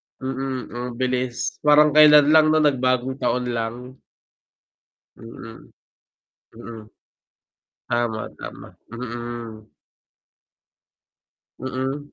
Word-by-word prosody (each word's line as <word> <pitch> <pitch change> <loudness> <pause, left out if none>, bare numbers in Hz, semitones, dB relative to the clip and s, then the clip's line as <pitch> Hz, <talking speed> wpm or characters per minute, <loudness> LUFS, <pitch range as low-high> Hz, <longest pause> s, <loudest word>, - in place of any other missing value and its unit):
Mm, 130 -1 -5
ang 120 +1 -5
bilis, 125 -1 -2
parang 150 0 +5
kailan 150 -1 +7
lang 155 -1 +6
'no, 155 - +3
nagbagong 130 -2 0
taon 125 +1 -1
lang. 120 +3 -5 1.2
Mm. 115 0 -12 0.8
Mm. 115 -1 -10 1.1
Tama, 120 -2 -1 0.2
tama, - - -9 0.3
mm. 120 -2 -7 1.9
Mm. 130 +2 -5
125 Hz, 80 wpm, -22 LUFS, 120-135 Hz, 1.9 s, kailan